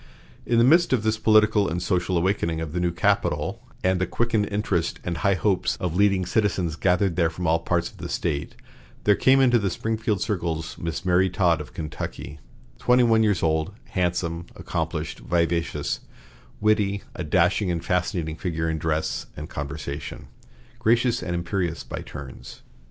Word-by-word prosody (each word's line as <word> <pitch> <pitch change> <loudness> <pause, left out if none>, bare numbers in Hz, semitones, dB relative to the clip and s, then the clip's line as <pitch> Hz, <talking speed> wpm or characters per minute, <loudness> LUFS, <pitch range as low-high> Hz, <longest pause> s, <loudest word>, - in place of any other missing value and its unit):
In 120 - +2
the 115 - +6
midst 170 +5 +5
of 120 -4 +1
this 110 0 +1
political 110 -2 +4
and 85 +2 -2
social 90 0 0
awakening 85 -2 0
of 80 -2 -5
the 90 - -1
new 90 0 +1
capital 85 - 0 0.2
and 95 0 +2
the 95 - +1
quickened 115 -2 0
interest 100 -5 -1
and 85 -1 -3
high 95 +5 +2
hopes 95 +2 +1
of 90 -3 -2
leading 100 -1 +3
citizens 90 -4 0
gathered 90 0 +1
there 85 -2 +3
from 90 +2 -5
all 80 0 +3
parts 85 +1 -1
of - - -19
the - - -6
State, 70 0 -2 0.5
there 105 - +5
came 135 +5 +4
into 125 -3 +5
the 100 -2 0
Springfield 110 +1 -1
circles 85 -5 -2
Miss 85 +1 -4
Mary 90 +1 +3
Todd 85 -4 +2
of 75 - -11
Kentucky, 75 -1 -6 0.4
twenty 125 0 +4
one 115 -2 +4
years 105 -5 +2
old, 80 +4 +1 0.2
handsome, 85 -2 -1
accomplished, - - -3
vivacious, 85 +6 -1 0.6
witty, 105 -2 +2
a - - -5
dashing 90 +4 +2
and 85 -2 -2
fascinating 85 -3 -1
figure 80 -2 -2
in 80 -1 -1
dress 80 0 -1
and 75 +1 -6
conversation, 70 0 -6 0.5
gracious 120 +1 +2
and 90 -1 -3
imperious 85 -1 -2
by - - -6
turns. 70 -4 -10
90 Hz, 170 wpm, -24 LUFS, 85-105 Hz, 0.6 s, the